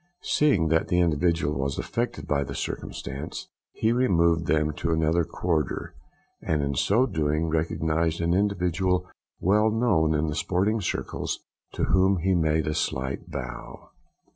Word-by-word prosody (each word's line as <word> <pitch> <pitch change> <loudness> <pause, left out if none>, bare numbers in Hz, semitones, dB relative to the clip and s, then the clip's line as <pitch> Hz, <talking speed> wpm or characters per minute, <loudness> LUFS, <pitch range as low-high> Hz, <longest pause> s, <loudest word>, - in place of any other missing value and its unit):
Seeing 105 - +2
that 80 0 +2
the 90 - +2
individual 80 -3 +1
was 70 0 -1
affected - - -3
by 70 -1 +1
the - - -7
circumstance, 70 +5 -5 0.3
he 110 - 0
removed 85 - +2
them 75 -1 +2
to 85 - -1
another 80 +1 +2
quarter, 80 -3 -2 0.5
and 75 -2 0
in 70 0 -1
so 105 - +3
doing 80 - 0
recognised 80 0 0
an 85 0 +1
individual 90 -2 +1 0.3
well 105 +4 +3
known 105 -9 +2
in 75 +1 +1
the 75 - -2
sporting 95 +7 0
circles, 90 - -3 0.3
to - - -2
whom 95 +1 +3
he 95 +3 +1
made 80 -2 +2
a 75 - -1
slight 65 +4 -2
bow. 70 -5 -7
85 Hz, 145 wpm, -26 LUFS, 75-95 Hz, 0.5 s, so